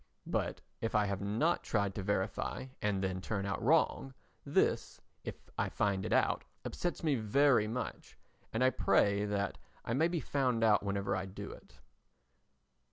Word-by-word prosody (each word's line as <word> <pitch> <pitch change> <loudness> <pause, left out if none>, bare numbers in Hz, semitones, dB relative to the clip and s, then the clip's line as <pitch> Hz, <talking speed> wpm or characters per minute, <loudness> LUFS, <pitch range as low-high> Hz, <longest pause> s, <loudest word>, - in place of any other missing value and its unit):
But - - -2 0.2
if 115 - -1
I 105 0 +4
have 100 -1 -2
not 115 +13 +1
tried 100 -3 0
to 100 - -4
verify 100 +5 -1 0.2
and 100 -2 0
then 95 -1 -1
turn 100 -1 -2
out 100 0 -2
wrong, 135 -1 +2 0.3
this, - - +1 0.2
if - - -5 0.2
I - - +1
find 100 -2 0
it - - -6
out, - - +2 0.2
upsets 175 -1 -3
me 155 -3 +3
very 120 0 +3
much 120 +3 -5 0.3
and 115 +3 +1
I 130 - +5
pray 100 -4 +3
that 100 -1 -1 0.3
I 115 - -1
may 155 +6 +3
be 170 -1 -1
found 130 -6 0
out 110 -2 +5
whenever 100 0 -1
I 95 +1 -2
do 95 - -7
it. - - -14
105 Hz, 165 wpm, -33 LUFS, 100-130 Hz, 0.3 s, I